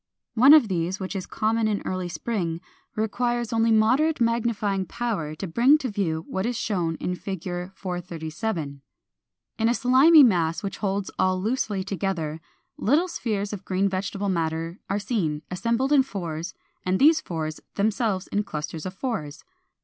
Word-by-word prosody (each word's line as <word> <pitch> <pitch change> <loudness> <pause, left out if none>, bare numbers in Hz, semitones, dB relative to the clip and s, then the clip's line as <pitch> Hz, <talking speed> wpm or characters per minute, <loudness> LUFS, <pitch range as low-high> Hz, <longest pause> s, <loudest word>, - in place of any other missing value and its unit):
One 265 +6 +8
of 295 -8 +5
these, 180 0 -1
which 190 +1 -5
is 190 - -4
common 220 +1 0
in 210 -2 -1
early 185 -1 -2
spring, 175 -4 -2 0.4
requires 240 +2 -1
only 225 0 +3
moderate 255 +9 +3
magnifying 220 -5 0
power 195 -11 -3
to 170 - -5
bring 240 - +4
to 270 -4 -3
view 165 -5 -2
what 190 - -2
is 245 -1 -2
shown 175 -6 -1
in 180 - -3
Fig. 185 -1 -5 0.3
437. 165 -3 -4 0.8
In 225 +1 +3
a 240 - +2
slimy 270 +6 +7
mass 170 -7 +2
which 195 - -4
holds 200 -1 -2
all 185 0 +2
loosely 210 -2 -1
together, 175 -5 -3 0.4
little 300 - +2
spheres 210 - -3
of 200 - -6
green 190 +1 +1
vegetable 195 +1 -2
matter 165 0 -2
are 200 - +1
seen, 175 -9 -1
assembled 235 +8 0
in 280 - +7
fours, 175 -8 -5 0.3
and 185 +1 +1
these 310 +5 +5
fours 155 -2 -4 0.2
themselves 205 -2 0
in 205 - 0
clusters 155 -3 -5
of 185 - -7
fours. 190 - -4
200 Hz, 155 wpm, -25 LUFS, 175-230 Hz, 0.8 s, One